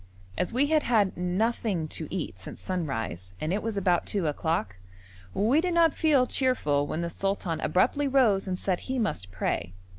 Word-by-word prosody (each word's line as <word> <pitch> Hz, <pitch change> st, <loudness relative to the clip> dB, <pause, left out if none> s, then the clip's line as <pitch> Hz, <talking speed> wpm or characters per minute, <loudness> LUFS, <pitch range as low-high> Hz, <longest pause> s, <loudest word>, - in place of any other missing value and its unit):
As 180 Hz, -, -1 dB
we 255 Hz, +5 st, +3 dB
had 310 Hz, +1 st, +3 dB
had 215 Hz, -7 st, +2 dB
nothing 185 Hz, -1 st, 0 dB
to 160 Hz, -, -4 dB
eat 170 Hz, -, -4 dB
since 95 Hz, -, -9 dB
sunrise, 115 Hz, -, -3 dB
and 155 Hz, -, -1 dB
it 205 Hz, -, 0 dB
was 225 Hz, -2 st, -3 dB
about 180 Hz, -3 st, +1 dB
two 195 Hz, -5 st, -1 dB
o'clock, 150 Hz, -, -1 dB, 0.6 s
we 240 Hz, +10 st, +3 dB
did 355 Hz, -1 st, -1 dB
not 330 Hz, -3 st, +5 dB
feel 290 Hz, -5 st, +3 dB
cheerful 150 Hz, -, +1 dB
when 160 Hz, -, -2 dB
the 170 Hz, -, -2 dB
sultan 195 Hz, -4 st, -2 dB
abruptly 280 Hz, +10 st, +2 dB
rose 235 Hz, -8 st, +3 dB
and 185 Hz, -1 st, -1 dB
said 185 Hz, -1 st, -1 dB
he 260 Hz, 0 st, -4 dB
must 195 Hz, -, -2 dB
pray. 90 Hz, -2 st, -2 dB
190 Hz, 180 wpm, -27 LUFS, 160-250 Hz, 0.6 s, not